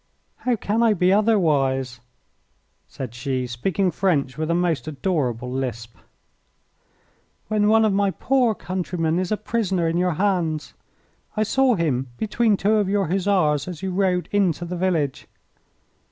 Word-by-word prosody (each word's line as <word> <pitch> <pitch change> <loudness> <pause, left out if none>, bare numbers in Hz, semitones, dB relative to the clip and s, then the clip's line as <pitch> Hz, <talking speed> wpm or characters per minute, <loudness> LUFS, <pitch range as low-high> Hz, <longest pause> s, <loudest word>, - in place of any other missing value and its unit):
"How 250 -1 0
can 215 +1 -1
I 225 -2 +4
be 180 +1 +3
otherwise," 145 - +1 0.9
said 125 -4 -7
she, 130 +1 -2
speaking 175 +11 -1
French 150 -10 0
with 155 +1 -3
a 170 - +2
most 170 -7 0
adorable 135 - -2
lisp, 120 -4 -4 1.5
"when 210 -1 +2
one 220 +1 +5
of 210 - +2
my 200 0 +2
poor 245 +2 +1
countrymen 175 -3 -2
is 185 +1 -2
a 215 - +1
prisoner 195 -6 -1
in 165 +1 0
your 180 0 +1
hands? 170 -5 -1 0.6
I 215 - +3
saw 260 +3 +2
him 140 -7 -1
between 220 -1 +1
two 210 +3 +2
of 205 -3 +1
your 195 -4 0
Hussars 180 -6 +1
as 175 -2 -7
you 190 - -2
rode 180 -2 0
into 180 -5 +1
the 180 +1 -5
village." 170 -7 -1
180 Hz, 150 wpm, -23 LUFS, 150-205 Hz, 1.5 s, one